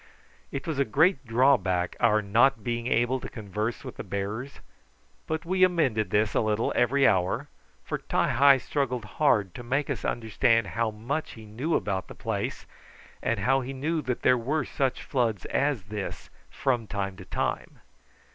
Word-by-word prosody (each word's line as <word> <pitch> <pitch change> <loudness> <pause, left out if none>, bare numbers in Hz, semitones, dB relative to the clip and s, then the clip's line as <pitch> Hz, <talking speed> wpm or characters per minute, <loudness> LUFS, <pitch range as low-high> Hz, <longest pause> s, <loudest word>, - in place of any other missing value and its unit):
It 135 - -4
was 155 -4 -2
a - - +5
great 140 - +2
drawback 115 -8 +2
our 110 -3 +3
not 115 +3 +3
being 120 +1 -2
able 120 +2 +2
to - - -7
converse 110 +3 -4
with 130 - -8
the - - -5
bearers, 105 +8 -4 0.7
but 160 +1 -3
we 185 +2 +2
amended 140 - +2
this 105 +1 +1
a - - +2
little 110 0 0
every 135 +3 +4
hour, 90 -2 +1 0.3
for - - -3
Ti - - 0
hi 140 0 +6
struggled 125 -3 -2
hard 105 - +1
to - - -8
make 135 +4 -1
us - - -4
understand 115 0 +1
how 115 +1 +1
much 120 +9 -4
he 110 -1 -11
knew 125 +10 -2
about 95 -2 -1
the - - -10
place - - -3 0.6
and 115 -4 -1
how 135 +6 +3
he 130 +2 -5
knew 155 +4 -1
that 125 -3 -3
there 125 - +4
were 140 +4 -1
such 135 -2 -1
floods 115 -8 -1
as 140 -7 0
this 100 0 -6 0.2
from 120 -5 -1
time 100 -2 -3
to 95 - -10
time. - - -3
120 Hz, 175 wpm, -27 LUFS, 105-135 Hz, 0.7 s, hi